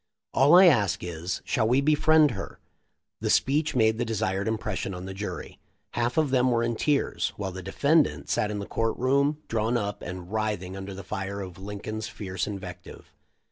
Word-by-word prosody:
All 140 +6 +6
I 185 +2 +9
ask 105 - +3
is, 85 +1 -4
shall 110 -2 +1
we 125 +4 +3
befriend 155 +1 +4
her?" 95 - -6 0.6
The - - -2
speech 150 +3 +2
made 110 -2 +3
the - - +2
desired 105 -3 -1
impression 110 -3 -2
on 90 +1 -7
the 95 - -6
jury. 100 +2 -6 0.3
Half 120 +3 -1
of 155 -4 +2
them 130 -1 +3
were 115 -1 +2
in 115 0 0
tears, 145 +4 0
while 95 -2 -3
the 95 +1 -7
de 95 +2 -7
fendant 150 +1 +2
sat 105 - 0
in 105 - -3
the 100 - -4
court 115 +2 -1
room, 140 +4 +1
drawn 115 +1 0
up 105 -2 -3
and 90 +1 -7
writh 110 -3 -1
ing 90 +1 -7
under 95 0 -7
the 95 - -8
fire 95 +1 -4
of 95 -2 -7
Lincoln's 105 +2 -5
fierce 95 -3 -4
invective. 90 -4 -8
110 Hz, 195 wpm, -27 LUFS, 95-130 Hz, 0.6 s, I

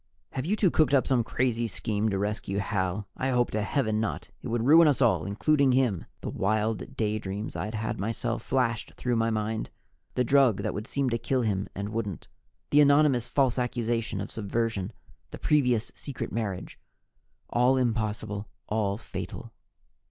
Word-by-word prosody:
"Have 130 +3 -3
you 205 - +2
two 200 -5 +3
cooked 150 -3 +3
up 130 - +3
some 125 -3 +2
crazy 120 0 0
scheme 110 0 -1
to 100 - -1
rescue 100 -1 -2
Hal? 100 0 -1
I 130 - -1
hope 125 -1 +2
to 110 - 0
heaven 110 -1 0
not! 110 -1 -3
It - - -6
would 115 0 -1
ruin 160 +4 +8
all - - +6
of 130 -5 +3
us, - - -5
including 140 +6 +3
him!" 125 -9 +1 0.2
The - - -4
wild 110 +2 -1
daydreams 105 -1 -2
I'd 105 +2 -3
had 110 0 -3
myself 115 +3 -2
flashed 120 -4 -1
through 125 -1 -1
my 115 0 +2
mind 110 0 -2 0.5
the 125 - +2
drug 130 -4 +4
that - - -1
would 105 +3 -5
seem 140 -3 0
to 115 - 0
kill 130 0 0
him 100 -3 0
and 100 +1 -3
wouldn't, 105 -6 -4 0.4
the 145 - +6
anonymous 140 -4 +4
false 130 -1 +2
accusation 120 -2 -1
of - - -5
subversion, 110 -2 -2 0.4
the - - -8
previous 125 -7 +2
secret 140 -4 -6
marriage. 105 -5 -4 0.7
All 125 +2 +4
impossible, 110 -4 -1 0.2
all 105 -2 0
fatal. 120 - -7
115 Hz, 175 wpm, -28 LUFS, 105-130 Hz, 0.7 s, ruin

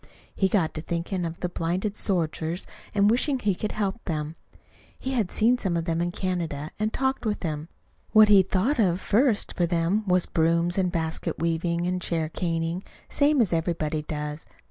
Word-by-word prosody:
He 190 - +2
got 180 -5 +1
to 155 - -5
thinking 170 +2 -2
of 165 0 -6
the 180 - 0
blinded 180 +5 -2
soldiers 170 -3 0 0.3
and 200 0 +4
wishing 255 +5 +2
he 210 -5 +1
could 210 +3 -4
help 205 +1 -2
them. 155 -1 -3 0.6
He 265 - -3
had 225 -8 0
seen 240 +3 +3
some 180 -6 0
of 165 - -2
them 165 -1 0
in 175 0 0
Canada, 170 -5 -3
and 215 +1 0
talked 265 +2 -1
with 215 -2 -1
them. 155 -2 -4 0.4
What 215 -1 +8
he 205 -2 +7
thought 195 +9 0
of 180 -4 +3
first 225 +2 +2
for 175 - +1
them 170 +5 +1
was 180 -1 +3
brooms, 170 +1 +1
and 185 -2 +1
basket 160 -1 -2
weaving 170 +1 0
and 180 0 -1
chair 165 -3 -1
caning, 165 +1 -2 0.3
same 285 -1 +3
as 195 -7 +1
everybody 160 -2 -1
does. 150 0 -5
175 Hz, 185 wpm, -26 LUFS, 165-205 Hz, 0.6 s, What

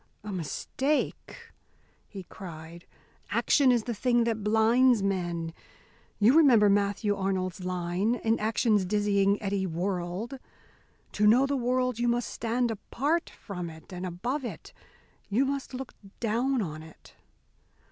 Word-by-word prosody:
"A 210 - -6
mistake!" 280 - -3 0.6
he 195 -2 -9
cried. 170 -2 -10 0.4
"Action 275 -3 +3
is 240 -3 +2
the 240 - -3
thing 240 +2 +2
that 225 -2 -1
blinds 225 +2 +4
men. 175 -4 -2 0.6
You 225 +6 +5
remember 245 -10 +6
Matthew 205 +1 +1
Arnold's 190 -1 -2
line: 180 +5 -1
In 225 -1 0
action's 215 -1 +2
dizzying 200 0 +2
eddy 195 -1 -1
whurled. 180 +7 -3 0.7
To 210 0 +2
know 245 +5 +6
the 280 +1 -1
world 250 -1 0
you 240 - +1
must 240 0 0
stand 235 +1 -1
apart 285 +9 -1
from 180 -5 -7
it 160 +3 -13
and 180 0 -6
above 230 - -3
it; 240 - -7 0.6
you 235 +7 +2
must 275 0 -3
look 260 0 -7 0.3
down 240 +2 0
on 155 -3 -6
it." 160 0 -15
210 Hz, 135 wpm, -28 LUFS, 185-245 Hz, 0.7 s, remember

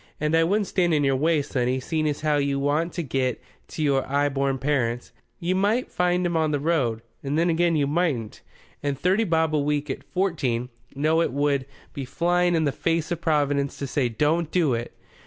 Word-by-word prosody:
And 150 +2 +1
I 165 - +4
wouldn't 200 +5 +1
stand 175 -4 +1
in 145 - +2
your 135 -1 +2
way, 155 +2 +2
sonny, 130 -2 -1
seeing 155 +3 -1
as 145 - -4
how 155 -1 +2
you 140 -1 0
want 150 +5 0
to 170 - -3
get 130 -3 -1 0.3
to 155 - -4
your 135 -2 +2
'igh 145 +1 +2
born 135 -1 0
parents. 125 -4 -1 0.3
You 175 +2 0
might 205 +6 +1
find 180 0 +1
'em 170 -1 -1
on 160 -1 +2
the 145 -1 0
road, 135 -8 0 0.2
and 140 +2 -2
then 170 +1 +3
again 170 0 +2
you 145 -2 +2
mightn't. 145 -8 -1 0.4
And 140 -1 -2
thirty 190 +8 +2
bob 160 -3 +1
a 150 - +3
week 145 0 -1
at - - -6
fourteen 140 -11 -1 0.3
no 155 +4 +2
it - - 0
would 140 -1 0 0.3
be 140 - -5
flying 175 +6 +1
in 160 - +2
the 145 - +1
face 165 +3 -1
of 170 -1 -2
Providence 145 -3 +1
to 140 - -4
say 130 -2 0
'don't 150 +7 +1
do 160 -7 +2
it! 115 0 -4
150 Hz, 210 wpm, -24 LUFS, 140-170 Hz, 0.4 s, I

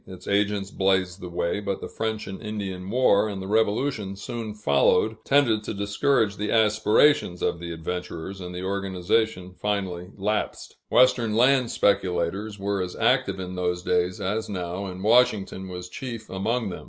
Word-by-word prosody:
Its 95 -1 -11
agents 100 -1 0
blazed 95 -1 +1
the 90 - -6
way, 85 +2 -1
but 100 -1 -3
the - - -6
French 110 -1 -3
and 95 - -7
Indian 95 -3 -5
War, 110 -3 +3
and 100 -2 -5
the 95 - -6
Revolution 110 0 0
soon 110 +1 -6
following, 105 +4 +2
tended 120 -7 +3
to 105 - -4
discourage 100 +2 +1
the 105 +1 -2
aspirations 110 -1 +3
of 85 - 0
the 85 0 -6
adventurers, 90 +2 -5
and 90 0 -7
the 90 - -5
organization 95 0 -1
finally 95 -4 -2
lapsed. 105 +2 -2
Western 125 -3 +4
land 125 +1 +4
speculators 100 +1 0
were 100 0 -1
as 90 -1 -4
active - - +2
in 90 0 -5
those 90 -1 -2
days 90 +1 0
as 105 +4 -2
now, 90 0 -4
and 95 0 -7
Washington 110 -4 +3
was 90 0 -6
chief 115 +2 -7
among 110 +4 -1
them. - - -6
100 Hz, 165 wpm, -25 LUFS, 90-110 Hz, -, Western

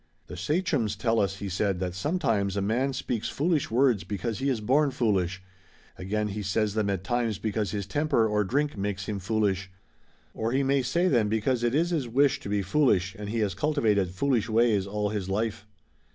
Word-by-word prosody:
"The 90 - -9
sachems 145 - 0
tell 115 -2 +1
us," 95 -2 0
he 100 0 -6
said, 95 0 -1
"that 90 -1 -2
sometimes 105 - 0
a - - +1
man 120 +7 +1
speaks 125 -4 -3
foolish 155 0 0
words 120 -3 +3
because 110 +3 -3
he 135 +1 0
is 125 -4 0
born 140 +7 +2
foolish, 95 -7 0 0.5
again 105 +3 -2
he 105 +1 -4
says 105 +1 0
them 105 -2 0
at 95 -2 -2
times 115 0 -1
because 105 -1 -2
his 100 +1 -3
temper 140 +1 +1
or 105 -1 +1
drink 145 +9 0
makes 100 -1 -3
him 105 -2 -3
foolish, 95 -1 0 0.6
or 115 +2 -2
he 135 +1 +2
may 135 0 +2
say 155 +9 +1
them 120 - +2
because 115 +3 0
it 120 +2 +1
is 170 +3 +2
his 150 -7 -1
wish 135 +3 +2
to - - -8
be 100 -1 0
foolish 100 -5 +2
and 105 -2 -7
he 115 - -2
has 100 -3 0
cultivated 105 - +1
foolish 115 +3 0
ways 110 -3 +2
all 105 +1 -1
his 100 -3 -3
life. 105 +1 -2
110 Hz, 200 wpm, -27 LUFS, 100-130 Hz, 0.6 s, words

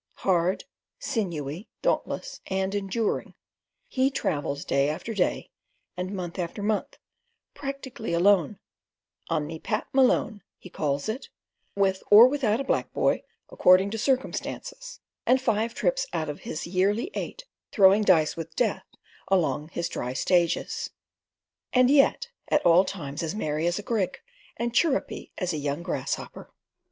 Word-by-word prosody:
Hard, 180 0 +2 0.3
sinewy, 175 - -3
dauntless, - - -1
and 190 0 -1
enduring, 205 +2 -2 0.5
he 265 - +2
travels 145 - -2
day 140 +1 +2
after 160 +9 -4
day 190 -4 -1 0.4
and 180 +1 -4
month 180 -2 -5
after 180 +3 -4
month, 210 0 -1 0.6
practically 275 -6 -6
alone—"on 175 -3 -1
me 160 +1 -7
Pat 215 +5 -2
Malone," 250 -5 +3 0.2
he 185 - -13
calls 140 -2 -1
it—with 200 -4 -3
or 215 +4 +10
without 255 -5 +1
a - - -1
black - - -1
boy, - - +2 0.3
according 185 +2 +5
to 225 - -3
circumstances, - - -3 0.3
and 260 - +5
five 230 -1 0
trips - - 0
out 155 - -1
of 145 - -5
his 155 - -4
yearly 200 - 0
eight - - -5 0.3
throwing 195 0 +6
dice 165 -7 +4
with 165 0 -7
death 205 -6 0 0.4
along 165 -5 +1
his 170 0 -2
dry 125 -6 -4
stages, 175 +4 +1 0.8
and 255 +1 +5
yet 290 - +4 0.2
at 300 - +1
all 175 +2 +7
times 150 -7 -5
as 165 +3 -3
merry 155 -4 -1
as 175 - 0
a 205 - -5
grig, 210 -4 -1 0.4
and 235 0 -1
as 235 - -1
chirrupy 305 -5 -1
as 180 -3 -1
a - - -2
young 145 +3 -3
grasshopper. - - -4
195 Hz, 140 wpm, -26 LUFS, 170-235 Hz, 0.8 s, or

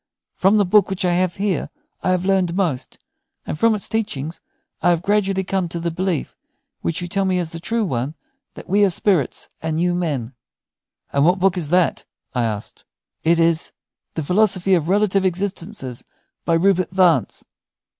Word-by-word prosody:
From 195 +3 +3
the 205 - +3
book 200 +2 +4
which 190 -1 -2
I 175 - +2
have 180 0 +1
here 195 -2 -1 0.3
I - - 0
have 185 0 +1
learned 185 -3 +1
most; 170 -10 -2 0.5
and 150 - -5
from 230 -1 +4
its 205 - -2
teachings 170 -9 -3 0.4
I - - +3
have 170 -1 +1
gradually 195 -1 +1
come 190 -2 -1
to 170 - -4
the 170 0 -2
belief, 180 -1 -2 0.5
which 165 +1 -2
you - - -4
tell 195 +2 0
me 190 -1 +1
is 170 -3 -2
the 165 - -6
true 225 +6 -1
one, 135 -1 -2 0.4
that - - -10
we 205 +3 +3
are 200 - +5
spirits 175 - +1
and 160 0 -2
you 175 +1 +2
men." 145 -9 -2 0.8
"And 140 - +3
what 175 +4 +4
book 190 0 +2
is 165 -5 -2
that?" 180 0 +2 0.3
I 125 -3 +1
asked. 105 -1 -5 0.4
"It 170 +1 +3
is 165 -1 +1 0.4
'The 160 - -2
Philosophy 190 +2 +3
of 170 -2 +1
Relative 195 -1 +2
Existences,' 185 - -3 0.4
by 165 - +2
Rupert 185 +1 +2
Vance." 180 -8 +2
180 Hz, 180 wpm, -21 LUFS, 165-195 Hz, 0.8 s, are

